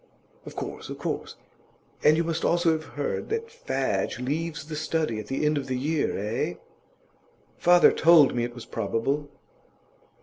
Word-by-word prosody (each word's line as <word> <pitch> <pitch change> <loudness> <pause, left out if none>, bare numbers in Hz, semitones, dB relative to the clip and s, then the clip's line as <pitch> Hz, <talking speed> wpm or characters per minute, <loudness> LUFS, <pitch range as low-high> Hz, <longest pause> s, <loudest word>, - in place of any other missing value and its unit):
'Of - - -9
course, - - -6
of - - -6
course. - - -4 0.7
And 155 - +6
you 165 - +2
must 165 0 -2
also 170 -1 +3
have 155 0 -1
heard 145 - -3
that 455 +1 -2
Fadge 475 +2 -2
leaves 150 +4 -3
The 155 0 -6
Study 155 -6 -1
at 105 - -7
the 135 +3 -1
end 150 -1 +2
of 135 - -6
this 130 -1 -1
year, 150 +3 0
eh?' 105 -3 -2 1.0
'Father 175 0 +6
told 160 -4 +6
me 120 - 0
it 120 0 -4
was 120 - -9
probable. 140 +6 -2
150 Hz, 165 wpm, -26 LUFS, 130-165 Hz, 1.0 s, And